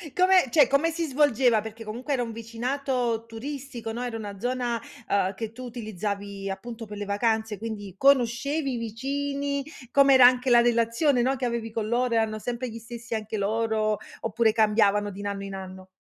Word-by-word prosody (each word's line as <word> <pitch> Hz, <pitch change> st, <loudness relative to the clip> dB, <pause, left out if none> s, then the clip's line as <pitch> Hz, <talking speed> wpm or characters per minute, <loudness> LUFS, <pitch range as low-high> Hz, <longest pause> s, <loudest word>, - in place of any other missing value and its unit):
Come 370 Hz, -5 st, +5 dB
cioè 275 Hz, 0 st, +5 dB
come 280 Hz, +5 st, +2 dB
si 330 Hz, +1 st, -2 dB
svolgeva 260 Hz, -6 st, +3 dB
perché 220 Hz, +1 st, -8 dB
comunque 240 Hz, +6 st, -4 dB
era 250 Hz, -3 st, +1 dB
un 230 Hz, -, -5 dB
vicinato 235 Hz, +1 st, -2 dB
turistico, 250 Hz, 0 st, -6 dB
no, 240 Hz, +2 st, -4 dB
era 235 Hz, -2 st, -3 dB
una 205 Hz, -3 st, -7 dB
zona, 245 Hz, -1 st, -1 dB, 0.3 s
uhm, 195 Hz, -1 st, +2 dB
che 220 Hz, +2 st, -5 dB
tu 250 Hz, +2 st, -9 dB
utilizzavi 205 Hz, -3 st, -5 dB
appunto 230 Hz, +4 st, -6 dB
per 210 Hz, -, -8 dB
le 205 Hz, -, -4 dB
vacanze 220 Hz, +1 st, 0 dB
quindi 210 Hz, -4 st, -6 dB
conoscevi 275 Hz, +3 st, +2 dB
i -, -, -2 dB
vicini? 280 Hz, +5 st, -2 dB, 0.3 s
Com'era 275 Hz, -2 st, +7 dB
anche 250 Hz, +1 st, +5 dB
la 240 Hz, -1 st, +7 dB
relazione, 240 Hz, +3 st, +2 dB
no, 260 Hz, +3 st, +2 dB
che 255 Hz, -1 st, -3 dB
avevi 235 Hz, -1 st, -2 dB
con 215 Hz, -1 st, -2 dB
loro 240 Hz, 0 st, +1 dB
erano 220 Hz, -1 st, +1 dB
sempre 245 Hz, +2 st, -4 dB
gli 230 Hz, 0 st, -8 dB
stessi 235 Hz, +1 st, -8 dB
anche 220 Hz, -1 st, -3 dB
loro 215 Hz, +1 st, 0 dB, 0.2 s
oppure 225 Hz, 0 st, +2 dB
cambiavano 210 Hz, -2 st, +3 dB
di 195 Hz, -, -10 dB
in 205 Hz, -, -4 dB
anno 200 Hz, -1 st, -4 dB
in 195 Hz, 0 st, -6 dB
anno? 185 Hz, -1 st, -8 dB
230 Hz, 185 wpm, -26 LUFS, 215-255 Hz, 0.3 s, Com'era